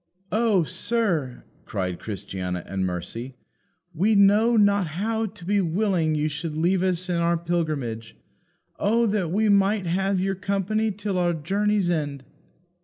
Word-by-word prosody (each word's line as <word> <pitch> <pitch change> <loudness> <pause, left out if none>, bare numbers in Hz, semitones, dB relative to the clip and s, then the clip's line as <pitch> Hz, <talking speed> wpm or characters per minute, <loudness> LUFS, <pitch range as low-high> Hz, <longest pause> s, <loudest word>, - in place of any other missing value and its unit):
"O 215 -5 +3
sir!" 170 - -1 0.2
cried 90 -4 -3
Christiana 90 -3 -5
and 95 -1 -2
Mercy, 115 +9 -5 0.6
"we 200 +7 +2
know 210 +4 +5
not 200 -3 +3
how 220 +8 -1
to 195 -3 -12
be 200 +2 +2
willing 175 -3 +1
you 150 0 +1
should 150 +1 -4
leave 175 +3 +2
us 185 -1 0
in 175 -1 0
our 170 0 +2
pilgrimage. 155 -10 -3 0.6
Oh 230 +3 +2
that 200 -6 0
we 215 +5 +1
might 200 0 +3
have 190 +3 0
your 195 +1 0
company 200 +3 -1
till 200 -1 -3
our 175 -1 +2
journey's 195 +4 0
end." 145 -5 -2
180 Hz, 145 wpm, -24 LUFS, 155-205 Hz, 0.6 s, know